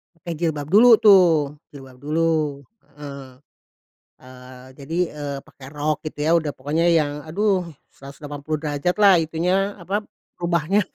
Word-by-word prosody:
Pakai 170 +1 -7
jilbab 155 -4 -2
dulu 230 +4 +7
tuh, 170 -9 +4 0.2
jilbab 135 -2 -13
dulu. 155 -1 -1 0.4
Heeh, 140 -2 -9 1.0
eee, 130 0 -14
jadi, 150 +5 -5 0.2
eee, 145 -1 -5
pakai 130 -1 -15
rok 150 +1 -2
gitu 155 - -7
ya, 160 - +2
udah 150 -3 -4
pokoknya 150 +5 -1
yang, 155 -4 +2
aduh 190 +1 0 0.3
180° 145 +3 -4
lah 200 -2 +6
itunya, 180 +5 -1
apa, 195 +3 -3 0.4
rubahnya. 170 +3 +1
155 Hz, 125 wpm, -22 LUFS, 145-175 Hz, 1.0 s, dulu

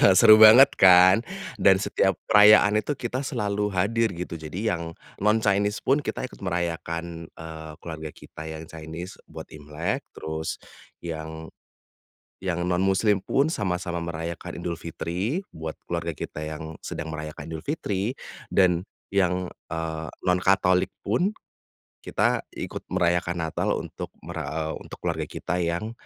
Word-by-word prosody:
seru 110 +1 +9
banget, 115 +6 +10
kan, 90 +1 +8 0.4
dan 95 - +6
setiap 100 -1 +1 0.2
perayaan 105 0 +7
itu 145 +7 -2
kita 125 0 -3
selalu 105 -6 -1
hadir 110 +5 +2
gitu 85 0 -5
jadi 90 +8 -2
yang 85 - -5 0.4
non 105 +2 +3
Chinese 100 0 +2
pun 135 +3 +3
kita - - -3
ikut - - -16
merayakan, 85 -1 -3
eee, 80 -1 -8
keluarga 80 -2 -6
kita 75 - -11
yang 80 0 -6
Chinese 80 +3 -7 0.2
buat - - -8
Imlek 75 +2 -4
terus 80 0 -4 0.5
yang 80 -1 -6 0.9
yang 90 -2 -1
non 90 +1 +1
muslim 95 +1 +3
pun 140 +3 +2
sama-sama 90 - -2
merayakan 85 +1 -5
Idul 85 -1 -2
Fitri 90 - -3
buat 80 0 -5
keluarga 85 -1 -2
kita 75 - -6
yang 80 +1 -6
sedang 80 - -5
merayakan 75 -1 -6
Idul 80 -1 -6
Fitri 110 -6 -2 0.4
dan 90 -2 +3 0.3
yang, 90 -1 +2 0.2
eee, 80 -1 -3 0.2
non 90 0 +4
katolik 95 -1 +3
pun, 150 - +1 0.7
kita - - +1
ikut - - -6
merayakan 85 -1 +1
Natal 80 - -2
untuk - - -6 0.2
mer 85 +1 -6
eee, 80 +1 -3
untuk - - -10
keluarga - - -1
kita 90 - -3
yang 85 +6 -1
90 Hz, 140 wpm, -25 LUFS, 80-100 Hz, 0.9 s, banget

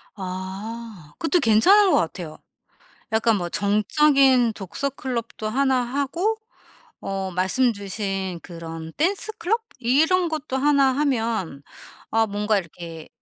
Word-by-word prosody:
아 190 -1 -7
그것도 340 +2 +2
괜찮은 365 - +5
것 - - +4
같아요. 165 -1 -3 0.7
약간 220 -1 +3
뭐 175 -1 -3
정적인 250 - +3
독서 210 +8 -3
클럽도 235 -4 -4
1 265 +1 +2
하고 285 - -1 0.6
어 195 -1 -3
말씀 190 +8 +2
주신 195 -3 -4
그런 165 -1 -8
댄스 390 +6 0
클럽 445 +6 0 0.2
이런 320 +9 +3
것도 310 -4 -3
1 280 0 +4
하면 225 - -1 0.5
아 225 0 +3
뭔가 210 0 0
이렇게 165 -2 -8
225 Hz, 215 characters per minute, -23 LUFS, 190-275 Hz, 0.7 s, 괜찮은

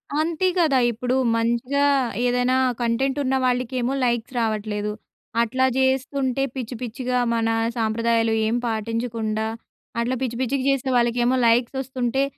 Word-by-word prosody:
అంతే 325 +4 +1
కదా! 315 -6 +3
ఇప్పుడు 245 +3 -2 0.2
మంచిగా 240 +5 +1 0.4
ఏదైనా 250 +1 +2 0.3
కంటెంట్ 255 +4 0
ఉన్న 265 0 +1
వాళ్ళకేమో, 250 0 0
లైక్స్ 240 0 0
రావట్లేదు. 210 -2 -1 0.5
అట్లా 260 +3 +1
జేస్తుంటే 265 0 +1
పిచ్చి, 250 -1 -5
పిచ్చిగా 250 +1 -2 0.2
మన 230 -1 +1 0.3
సాంప్రదాయాలు 225 0 +1
ఏం 225 - 0
పాటించకుండా, 220 -1 -2 0.5
అట్లా 245 +2 0
పిచ్చి, 240 -3 -2
పిచ్చిగా 260 +1 0
చేసే 275 -1 0
వాళ్ళకేమో 240 +1 +2
లైక్స్ 235 +3 +2
వస్తుంటే, 260 0 -1
245 Hz, 120 wpm, -23 LUFS, 230-260 Hz, 0.5 s, కదా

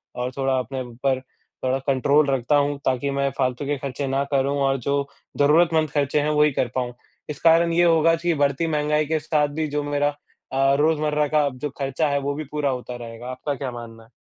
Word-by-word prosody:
और 125 +1 -3
थोड़ा 135 -1 +1
अपने 130 +1 -4
ऊपर 125 +2 -1
अ, 130 0 -5
कंट्रोल 140 +2 +3
रखता 135 +2 +1
हूँ 145 0 +1
ताकि 130 +2 0
मैं 140 0 0
फालतू 130 +1 -1
के 145 0 -1
खर्चे 135 +1 -4
ना 135 +1 0
करूँ 140 +1 +1
और 135 0 +2
जो 140 0 0 0.3
जरूरतमंद 155 +2 +3
खर्चे 145 0 +1
हैं 150 - 0
वही 150 0 +3
कर 130 - 0
पाऊँ। 125 -1 -2 0.4
इस 150 - -5
कारण 165 0 +5
ये 175 +1 +4
होगा 165 -1 +4
कि 170 +1 0
बढ़ती 140 +4 +1
महँगाई 150 0 +1
के 160 +1 0
साथ 150 -1 +1
भी 155 - 0
जो 150 0 -2
मेरा 145 0 +1 0.4
अ, 135 +1 +3
रोज़मर्रा 150 -1 +2
का 150 0 +2
जो 145 +4 -4
खर्चा 135 +3 0
है 140 - +1
वो 140 +1 -2
भी 155 - -4
पूरा 150 -1 0
होता 125 -1 -4
रहेगा, 120 0 -9
आपका 140 +3 -4
क्या 135 -2 -4
मानना 115 -1 -10
है? 115 - -23
140 Hz, 210 wpm, -23 LUFS, 130-150 Hz, 0.4 s, कारण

